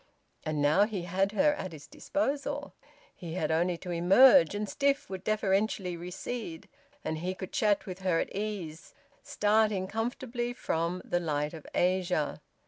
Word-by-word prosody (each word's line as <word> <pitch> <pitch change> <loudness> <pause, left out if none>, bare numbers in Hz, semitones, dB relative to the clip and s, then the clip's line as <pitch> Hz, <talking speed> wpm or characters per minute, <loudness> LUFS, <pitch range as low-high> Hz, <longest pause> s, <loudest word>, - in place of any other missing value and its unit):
And 150 -2 -1
now, 155 +8 +5
he 205 -5 -4
had 190 +3 0
her 295 +6 +4
at 185 - -6
his 150 -2 -10
disposal; 290 -1 -2 0.4
he 170 -2 -7
had 160 -4 -1
only 170 +2 +1
to 180 - -7
emerge, 180 +2 +6
and 210 0 -2
Stiff 280 -1 0
would 190 -1 -5
deferentially 200 -3 0
recede, 175 +1 -6 0.4
and 155 - -2
he 180 +3 -3
could 185 -1 -8
chat 210 -2 +2
with 185 -1 -7
her 185 -3 +1
at - - -3
ease, 195 -7 -5 0.3
starting 210 -2 +2
comfortably 240 +3 -3
from 170 -5 -2
"The 175 - 0
Light 150 -2 -1
of 160 -3 -10
Asia." 180 -4 +1
185 Hz, 155 wpm, -30 LUFS, 170-215 Hz, 0.4 s, emerge